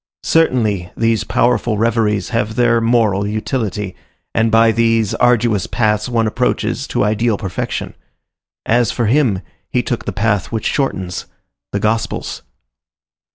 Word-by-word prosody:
Certainly, 110 - +2
these 115 -1 +1
powerful 120 -1 +1
reveries 110 -2 +1
have 110 -2 -1
their 120 -1 +3
moral 110 -4 +2
utility, 105 -3 -3 0.4
and 110 0 +2
by 115 0 +5
these 115 -2 +2
arduous 120 -5 +2
paths 105 0 0
one 115 -2 +1
approaches 120 +3 -1
to - - 0
ideal 110 +1 +1
perfection. 95 -2 -4 0.7
As 120 -1 +2
for 120 - -1
him, 115 -5 +2 0.3
he - - 0
took - - -3
the - - -2
path 105 -2 0
which 110 -2 -3
shortens,—the 95 -5 -4
Gospel's. 110 +2 -2
115 Hz, 125 wpm, -17 LUFS, 105-120 Hz, 0.7 s, by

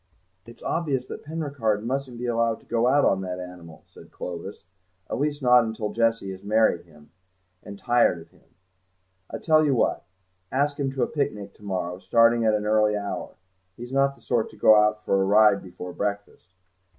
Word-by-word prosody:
"It's 115 - -14
obvious 140 -7 -1
that - - -9
Penricarde 140 -9 -2
mustn't 130 0 -3
be 125 - -5
allowed 115 -1 0
to - - -24
go 120 +1 +1
out 140 +2 +4
on 95 - +2
that 90 -1 -5
animal," 90 -3 -11
said - - -16
Clovis, 90 +3 -7 0.5
"at - - -2
least 145 0 -2
not 125 -3 +4
till 105 -1 -4
Jessie 115 -4 0
has 95 0 -10
married 105 -4 +2
him, 75 -2 -20 0.5
and 100 - -10
tired 120 -5 +2
of 80 - -15
him. - - -28 0.7
I - - -5
tell 155 -1 +3
you 140 -3 +2
what: - - 0 0.5
ask 145 +2 0
him 135 -2 -1
to 135 - 0
a - - 0
picnic 105 -9 -3
to 105 - -21
morrow, 90 -2 -3
starting 115 +2 +3
at 110 -1 +3
an 105 0 -2
early 105 0 +2
hour; 100 0 -5 0.4
he's 120 +1 -9
not 140 0 +2
the - - -24
sort 120 -3 0
to - - -16
go 110 - +6
out 105 0 +3
for 95 - +2
a - - +3
ride 105 0 +4
before 90 -1 -9
breakfast. 100 -3 -4
110 Hz, 195 wpm, -25 LUFS, 100-130 Hz, 0.7 s, go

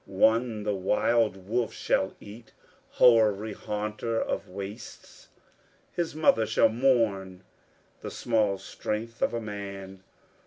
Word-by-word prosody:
One 110 +3 +2
the 105 0 0
wild 100 0 +1
wolf 115 +1 0
shall 95 - 0
eat, 110 +2 -13 0.4
hoary 110 -3 +4
haunter 105 +2 -3
of - - -3
wastes: 100 +4 -9 0.6
His 170 -3 -3
mother 115 -8 +3
shall 110 - +4
mourn 110 -7 +1 0.6
the - - -6
small 110 -4 0
strength 105 +3 -5
of - - +2
a - - -1
man. 100 -3 -7
105 Hz, 115 wpm, -27 LUFS, 100-115 Hz, 0.6 s, hoary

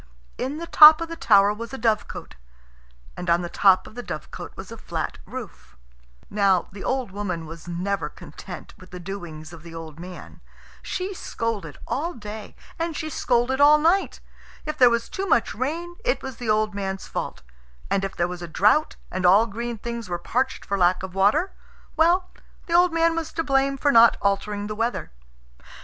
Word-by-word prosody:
In 270 +4 -2
the 335 - -5
top 310 -1 +9
of 335 0 -4
the 330 - -5
tower 205 -8 +4
was 230 +4 -7
a - - -6
dovecot, 220 -3 -1 0.8
and 180 - -5
on 170 +1 +3
the 175 - -4
top 190 +1 +4
of - - -12
the 245 - -6
dovecot 155 -10 -8
was - - -9
a - - -8
flat - - -4
roof. - - -9 0.5
Now, 195 -3 +2
the 195 +1 -9
old 260 -6 -1
woman 185 -5 -4
was 165 +1 -10
never 185 +3 -2
content - - -10
with 185 - -14
the 180 - -8
doings 175 -4 -8
of 165 - -11
the 165 0 -11
old 160 -1 -9
man. 180 +1 -10 0.4
She 380 +2 -4
scolded 225 - -4
all 335 +6 -2
day, 210 -1 -8 0.2
and 330 -1 -2
she 315 -1 -4
scolded 250 +1 +1
all 295 +1 +8
night. 335 +6 +1 0.4
If 305 0 -3
there 250 -2 +8
was 235 0 0
too 390 0 -4
much 235 - +2
rain, 330 +8 -4
it - - 0
was 265 -3 -6
the 240 -3 -5
old 215 0 +2
man's 195 -1 -4
fault; - - -5 0.5
and 195 - +1
if 195 - -4
there 175 - +1
was 180 0 -7
a 175 - -5
drought, 210 - +3 0.2
and 185 0 -3
all 195 +5 +6
green 235 +2 -5
things 235 -1 -6
were 175 - -1
parched 255 +9 -2
for 200 0 -2
lack 180 +1 +3
of 190 -1 -6
water, 210 - +2 0.4
well, 345 +3 +3 0.4
the 335 - -4
old 350 +1 +5
man 330 0 +2
was 325 -1 -3
to 330 - -1
blame 275 -1 +1
for 285 +1 +2
not 230 -2 +7
altering 205 +1 -1
the 215 - -4
weather. 230 - -2
215 Hz, 195 wpm, -24 LUFS, 185-290 Hz, 0.8 s, top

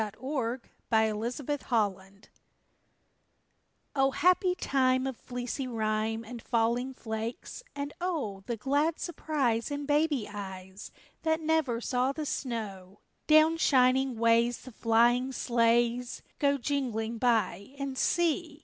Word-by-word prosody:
THE - - +1
FIRST 260 -2 -2 0.3
SLEIGH 230 +6 0
RIDE 200 -4 -1 1.7
O 270 -1 +4
happy 360 +5 +3
time 260 -4 +1
of 265 -1 -3
fleecy 245 +2 -5
rime 220 -1 -1
And 235 +1 -8
falling 240 +3 0
flakes, 225 - -5
and 285 0 -4
O 285 - -2
The 235 - -2
glad 285 +7 +1
surprise 280 -9 -1
in 285 0 -4
baby 295 -4 +1
eyes 190 -1 -8 0.3
That 320 0 +1
never 315 -7 +1
saw 250 +2 0
the 310 +1 -4
snow! 210 -8 -5 0.3
Down 310 +1 +6
shining 260 -3 +3
ways 230 +1 +3
the 255 - -11
flying 240 +3 +3
sleighs 240 0 +1 0.2
Go 280 -1 +3
jingling 235 -4 -2
by, 225 -1 0
and 275 -1 -4
see! 325 +1 0
245 Hz, 120 wpm, -29 LUFS, 225-285 Hz, 1.7 s, Down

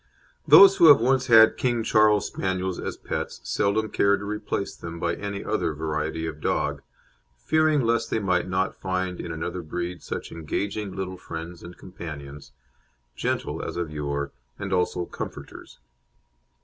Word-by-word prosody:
Those 195 0 +9
who 170 - +7
have 145 -5 +9
once 130 +2 +2
had 110 -2 +7
King 120 -2 0
Charles 110 -2 +4
Spaniels 95 -1 -2
as - - -5
pets - - -5
seldom 100 - 0
care 100 0 +3
to 100 - -7
replace 105 -1 -3
them 85 0 -8
by 85 0 0
any 100 +1 -5
other 90 -7 -1
variety 80 +1 -3
of 80 -1 -6
dog, - - -1 0.6
fearing 155 - +2
lest 115 -1 +1
they - - 0
might 95 -3 0
not 95 +1 0
find 95 -1 -2
in 85 - -5
another 85 +2 -4
breed 85 +2 -5
such - - -6
engaging 100 +5 -4
little 95 -1 -4
friends 85 0 -8
and 85 0 -11
companions, 75 -6 -9 0.6
"gentle" - - -2
as - - -5
of 85 -3 -3
yore 70 -1 -3 0.3
and 100 0 -4
also 90 -1 0
"comforters." - - -9
95 Hz, 155 wpm, -25 LUFS, 85-105 Hz, 0.6 s, Those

